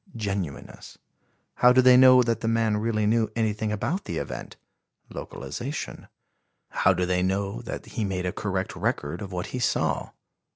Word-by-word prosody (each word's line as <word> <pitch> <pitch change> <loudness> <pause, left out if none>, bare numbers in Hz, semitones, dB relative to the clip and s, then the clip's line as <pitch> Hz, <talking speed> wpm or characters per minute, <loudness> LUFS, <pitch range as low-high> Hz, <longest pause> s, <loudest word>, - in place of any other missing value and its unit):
(Genuineness.) 100 -8 -5 0.6
How 125 - +6
do 130 - +4
they 130 0 +7
know 130 0 +8
that 115 -1 -1
the 115 - -2
man 115 -2 +2
really 110 -1 0
knew 110 +1 +2
anything 110 -1 -1
about 135 - -2
the - - -4
event? - - -6 0.5
(Localization.) 120 - -6 0.6
How - - +3
do 90 - 0
they 90 0 +1
know 95 -6 -1
that - - -6
he 110 - -4
made 95 -2 -2
a 90 - 0
correct - - -3
record 75 +6 -2
of 100 -2 -6
what 90 -1 -3
he 125 - -2
saw? 120 - 0
110 Hz, 165 wpm, -26 LUFS, 95-120 Hz, 0.6 s, know